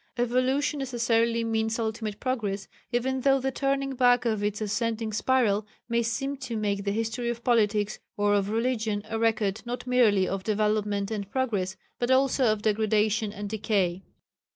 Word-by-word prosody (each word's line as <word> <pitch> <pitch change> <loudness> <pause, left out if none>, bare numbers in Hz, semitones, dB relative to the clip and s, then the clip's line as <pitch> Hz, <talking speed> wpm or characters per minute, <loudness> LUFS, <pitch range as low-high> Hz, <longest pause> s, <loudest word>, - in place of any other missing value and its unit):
Evolution 255 +4 +1
necessarily 230 -3 +1
means 225 0 0
ultimate 220 -2 -3
progress, 205 -7 -2 0.2
even 260 +2 0
though 270 +1 +4
the 265 +1 -1
turning 275 0 -1
back 245 -1 +4
of 215 -3 0
its 210 0 -1
ascending 220 +1 -2
spiral 215 -3 +2 0.2
may 235 0 +1
seem 270 +5 -2
to 255 -4 -5
make 200 -2 -1
the 200 - +1
history 225 +3 -2
of 235 0 -4
politics 210 -3 +2 0.2
or 205 0 +2
of 200 -1 +1
religion 225 -2 0
a 225 - -2
record 220 -2 +1
not 245 +1 -5
merely 225 -7 +3
of 195 -1 -3
development 210 -1 0
and 200 -3 -4
progress 205 -7 -1 0.2
but 240 - 0
also 260 0 +3
of 215 -2 +1
degradation 215 0 +1
and 205 0 -6
decay. 195 -4 0
225 Hz, 160 wpm, -27 LUFS, 210-245 Hz, 0.2 s, though